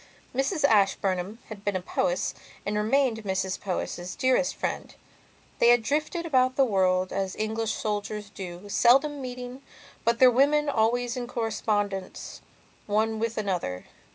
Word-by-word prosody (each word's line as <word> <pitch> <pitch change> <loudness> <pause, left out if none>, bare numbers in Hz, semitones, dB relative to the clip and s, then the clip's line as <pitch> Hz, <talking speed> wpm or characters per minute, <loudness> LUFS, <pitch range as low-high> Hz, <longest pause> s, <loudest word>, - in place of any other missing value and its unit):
Mrs 275 +5 0
Ashburnham 195 -3 +2
had 205 -2 -9
been 205 -2 -1
a - - +1
Powys 180 +1 -1 0.3
and 205 - -1
remained 225 +1 +1
Mrs 190 -1 -2
Powys' 180 -1 -4
dearest 260 +1 +2
friend. - - -4 0.6
They - - +5
had 240 -1 +5
drifted 305 +6 -1
about 255 -4 +2
the 270 - +4
world 185 -4 +1
as 195 -1 -2
English 220 +1 -1
soldiers 210 -1 -3
do, 180 0 -8
seldom 275 +7 +3
meeting, 250 0 -7 0.4
but 235 0 +2
their 255 +1 +7
women 290 +4 +3
always 240 0 +1
in 245 -1 -4
correspondence 205 -5 -2 0.5
one 220 +1 +1
with 230 0 -2
another. 180 - -2
220 Hz, 140 wpm, -27 LUFS, 195-255 Hz, 0.6 s, their